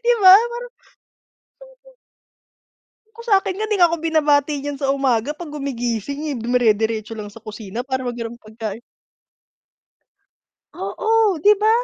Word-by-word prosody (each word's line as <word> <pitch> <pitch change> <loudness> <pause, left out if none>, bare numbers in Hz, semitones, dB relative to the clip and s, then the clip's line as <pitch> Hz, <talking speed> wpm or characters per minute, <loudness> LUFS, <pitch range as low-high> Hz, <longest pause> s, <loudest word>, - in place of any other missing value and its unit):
'Di 485 0 +4
ba, 375 -1 +10 0.2
para 480 +1 -6 1.1
sobra. - - -22 1.2
Kung 465 +1 -12
sa'kin 390 -3 +2
nga 435 - -1
di 420 - +1
nga 350 -3 +5
'ko 335 - -1
binabati 300 -2 +2
niyan 285 0 -5
sa 270 - 0
umaga 265 -3 +1
'pag 315 -1 -9
gumigising, 275 +1 -3
eh. - - -4
Dumire-diretso 225 -2 +1
lang 210 -2 -7
sa 220 +2 -15
kusina 215 +2 -7
para 260 -1 -2
maghanap 240 -1 -5
pagkain. 220 0 -7 1.9
Oo, 440 -5 +1
'di 415 +7 +5
ba? 430 - +4
275 Hz, 135 wpm, -20 LUFS, 230-370 Hz, 1.9 s, ba